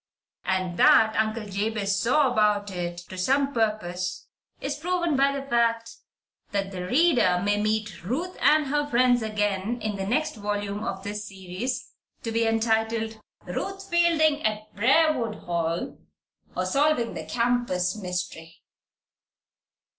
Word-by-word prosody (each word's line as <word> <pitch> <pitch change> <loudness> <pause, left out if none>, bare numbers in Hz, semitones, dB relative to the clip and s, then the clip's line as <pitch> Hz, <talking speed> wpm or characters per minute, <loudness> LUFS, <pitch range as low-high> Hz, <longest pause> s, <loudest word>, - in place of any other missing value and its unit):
And 185 -2 -1
that 220 0 +6
Uncle 220 0 0
Jabez 200 +1 -1
Potter 255 +6 +3
"saw 260 - +2
about 210 -2 +2
it" 175 -1 -4
to 185 - -8
some 275 +8 +2
purpose 205 -6 -2 0.3
is 280 +1 -3
proven 345 -1 0
by 275 +1 +4
the 275 0 -4
fact 230 -2 +1 0.6
that 195 -1 -2
the 180 -1 -5
reader 250 - +3
may 205 0 +2
meet 210 -4 -2
Ruth 310 - -3
and 300 +3 +5
her 290 +1 0
friends 245 -2 +3
again 210 +1 -1
in 215 -2 -3
the 195 0 -3
next 250 +4 0
volume 205 0 -3
of 190 -3 -4
this 210 +1 -5
series 190 +6 -5 0.3
to 230 - -3
be 230 0 +1
entitled 225 0 0 0.2
"Ruth 390 0 -5
Fielding 320 -3 +3
at 215 0 -2
Briarwood 255 0 +3
Hall; 170 -1 -2 0.6
Or, 185 - 0
Solving 275 +2 +1
the - - -5
Campus 235 -7 0
Mystery." 180 -4 -5
220 Hz, 140 wpm, -26 LUFS, 195-260 Hz, 0.6 s, that